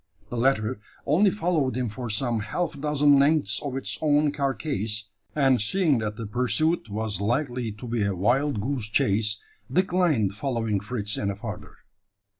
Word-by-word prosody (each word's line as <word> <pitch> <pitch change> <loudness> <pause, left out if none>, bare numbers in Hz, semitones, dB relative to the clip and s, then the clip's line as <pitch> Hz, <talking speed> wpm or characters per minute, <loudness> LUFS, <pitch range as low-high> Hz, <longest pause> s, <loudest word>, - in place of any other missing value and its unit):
The - - -3
latter 120 -2 +1 0.3
only 180 +8 +4
followed 165 -10 0
him 125 -1 0
for 120 +2 -5
some 115 +2 0
half 145 +8 -3
dozen 145 -1 +4
lengths 140 -8 +3
of 135 -2 -3
its 135 - -2
own 150 -1 +3
carcase; 125 -7 -2 0.2
and 135 -5 +3
seeing 155 - +2
that 105 -1 -3
the 115 - -6
pursuit 125 +7 0
was 105 -1 -3
likely 120 +1 -1
to 105 +4 -10
be 120 -1 -1
a 100 -1 -1
wild 125 +7 +1
goose 125 -2 -2
chase, 105 +1 +2 0.3
declined 170 - +2
following 115 -4 -1
Fritz 105 0 -2
any 100 -1 -1
farther. 105 -1 -8
125 Hz, 155 wpm, -26 LUFS, 105-145 Hz, 0.3 s, only